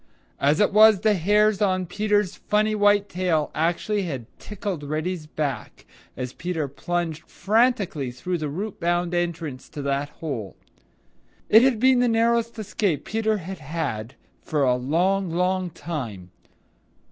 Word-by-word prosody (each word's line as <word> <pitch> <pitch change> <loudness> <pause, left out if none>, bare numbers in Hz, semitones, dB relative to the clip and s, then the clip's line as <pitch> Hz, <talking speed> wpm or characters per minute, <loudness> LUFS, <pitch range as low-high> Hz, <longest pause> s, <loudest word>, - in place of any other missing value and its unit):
As 145 +2 +3
it 205 -2 +3
was, 215 -2 +7
the 215 -1 +4
hairs 210 +3 +2
on 185 -2 +1
Peter's 205 +1 0
funny 215 +1 +1
white 205 -1 +3
tail 175 -5 0
actually 175 +6 0
had 135 -8 -5
tickled 200 -5 -5
Reddy's 155 +3 -3
back 150 -3 -4 0.3
as 125 0 -4
Peter 170 -4 -3
plunged 160 +3 -4
frantically 210 - +1
through 175 +8 -4
the 150 -1 -3
root 195 +8 -5
bound 175 0 0
entrance 165 -6 -3
to 145 - -7
that 140 +1 -1
hole. 130 - -6 0.9
It 220 - +8
had 250 -3 +3
been 260 +1 +5
the 245 - +3
narrowest 230 0 +1
escape 205 -6 -1
Peter 220 0 0
had 190 0 -7
had 135 -6 -4 0.3
for 150 -2 -1
a 125 -2 +4
long, 175 +9 +1
long 180 +2 0
time. 115 - -6
175 Hz, 145 wpm, -24 LUFS, 150-210 Hz, 0.9 s, It